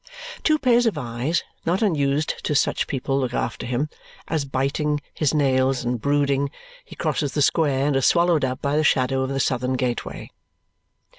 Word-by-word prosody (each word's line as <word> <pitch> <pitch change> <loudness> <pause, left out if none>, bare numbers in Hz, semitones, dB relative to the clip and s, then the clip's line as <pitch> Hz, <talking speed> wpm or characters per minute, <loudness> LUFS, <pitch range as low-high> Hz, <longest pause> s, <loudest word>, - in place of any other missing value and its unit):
Two 310 -1 +3
pairs 245 -4 +3
of 210 - 0
eyes 125 +5 -2 0.2
not 180 +6 0
unused 150 -6 0
to 150 - 0
such - - +1
people 135 0 -1
look 125 -2 -2
after 115 - -3
him, 125 +5 -1 0.4
as, 155 -3 -1
biting 140 +3 -1
his 150 -4 +1
nails 130 -3 +1
and 120 -1 -1
brooding, 140 -1 +1 0.3
he - - -13
crosses 145 -3 -1
the 150 - 0
square 140 -3 +2
and 145 -1 +1
is 135 - +3
swallowed 170 -3 +3
up 130 +2 -2
by 140 0 0
the 155 - +2
shadow 130 -2 +2
of 130 - -1
the 135 0 -2
southern 130 -1 0
gateway. 125 -2 -3
140 Hz, 175 wpm, -23 LUFS, 130-155 Hz, 0.4 s, Two